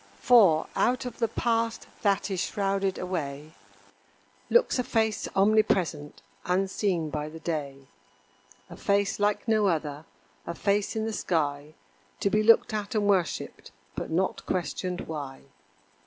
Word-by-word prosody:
For, 195 -11 +5
out 250 +1 +1
of 250 - -7
the 230 - +2
past 230 0 -1 0.2
that 200 0 +1
is 190 - -2
shrouded 195 -1 -1
away, 155 -4 -4 1.0
Looks 475 - +3
a - - +2
face 220 -3 0
omnipresent, 195 -7 +1 0.2
unseen 185 -3 0
by 150 0 -3
the 160 +1 -10
day. 140 -5 -4 0.8
A - - -11
face 200 0 0
like 205 +2 0
no 215 -2 +3
other 150 -3 -2 0.4
a 170 - -4
face 200 +3 0
in 220 0 -1
the 225 - -3
sky 150 -5 -2 0.5
To 200 - +1
be 215 - +3
looked 230 +1 +5
at 210 0 -3
and 210 -1 +1
worshipped, 185 -5 -1 0.3
but - - -4
not 185 +4 -1
questioned 180 0 -2
why. 145 -4 -6
195 Hz, 140 wpm, -27 LUFS, 160-215 Hz, 1.0 s, For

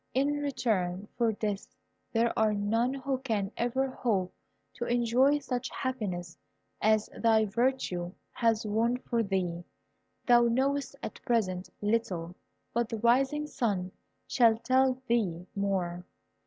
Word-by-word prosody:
In 285 +2 +2
return 210 -9 -1
for 235 -2 +2
this, 210 +4 -4 0.3
there 230 0 +2
are 220 -2 +2
none 225 +5 +1
who 270 -1 -2
can 215 -6 -1
ever 260 +3 0
hope 215 -8 -1 0.4
to 240 - -4
enjoy 245 +4 +3
such 255 -3 -3
happiness 195 -10 -3 0.5
as 215 0 +3
thy 220 -1 +4
virtue 210 -6 0 0.2
has 225 -2 +1
won 225 +4 +1
for 235 -2 -1
thee. 185 -4 -1 0.6
Thou 240 -1 +6
knowest 275 +4 0
at - - -6
present 185 -6 0
little, 185 -6 -1 0.4
but 235 -1 0
the 225 - -3
rising 265 +6 +2
sun 200 -10 -1 0.3
shall 230 -3 +4
tell 255 +2 +2
thee 185 -8 0
more." 185 -3 -1
230 Hz, 130 wpm, -30 LUFS, 200-255 Hz, 0.6 s, Thou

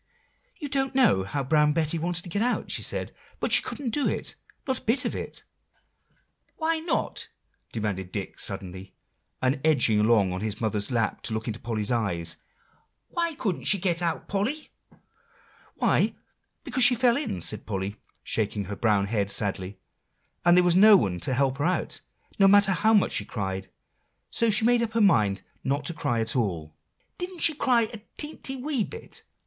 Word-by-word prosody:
"You 300 - -5
don't 270 -1 -1
know 240 - +4
how 135 +9 -3
Brown 150 +2 +3
Betty 160 +1 0
wanted 175 +1 -2
to 180 - -9
get 200 +5 -2
out," 245 +1 0
she - - -1
said; - - -3 0.3
"but - - -2
she - - +6
couldn't 255 -5 -4
do 290 +4 +1
it, - - -3 0.3
not 260 - 0
a - - -23
bit 245 +4 +1
of - - -1
it." - - -7 1.1
"Why 320 0 +1
not?" 330 +2 -2 0.4
demanded 100 -4 -3
Dick 100 -1 -5
suddenly, 95 -2 -4 0.5
and 130 +1 +1
edging 125 -9 +3
along 105 -4 +3
on 90 - -4
his 110 -1 -3
mother's 105 -2 0
lap 115 -4 -1
to 110 - -3
look 110 +1 -4
into 115 0 -4
Polly's 110 -2 -1
eyes. 90 -8 -1 0.7
"Why 335 -2 -1
couldn't 200 -11 -3
she 205 - +4
get 175 -2 0
out, 170 -2 -2
Polly?" 230 +11 -2 1.1
"Why, - - +1 0.5
because 260 - +2
she 245 +1 +7
fell 240 0 +3
in," 280 - -2
said 105 +5 -1
Polly, 100 0 -3 0.3
shaking 105 -2 -2
her 100 +3 -5
brown 105 -3 +2
head 100 -1 -1
sadly, 100 -1 -1 0.7
"and 175 0 +5
there 180 - +6
was 175 -1 +3
no 210 +2 +8
one 90 - -1
to 130 - -1
help 135 +1 0
her 145 - 0
out, 185 - -1 0.4
no 195 - +7
matter 200 0 +5
how 220 +4 +3
much 205 - +3
she - - +1
cried; 95 -3 -4 0.6
so 230 - +2
she 220 +1 +3
made 240 0 +4
up 225 -2 -2
her 230 - +1
mind 105 - +3 0.2
not 140 +2 -1
to 170 - +1
cry 120 -7 -1
at 110 0 -2
all." 85 -10 -2 0.4
"Didn't 360 -1 -5
she 315 - +5
cry 250 -5 +2
a 220 -1 -7 0.2
teenty, 295 -3 0
wee 270 -3 0
bit?" 455 - -10
150 Hz, 185 wpm, -26 LUFS, -, 1.1 s, no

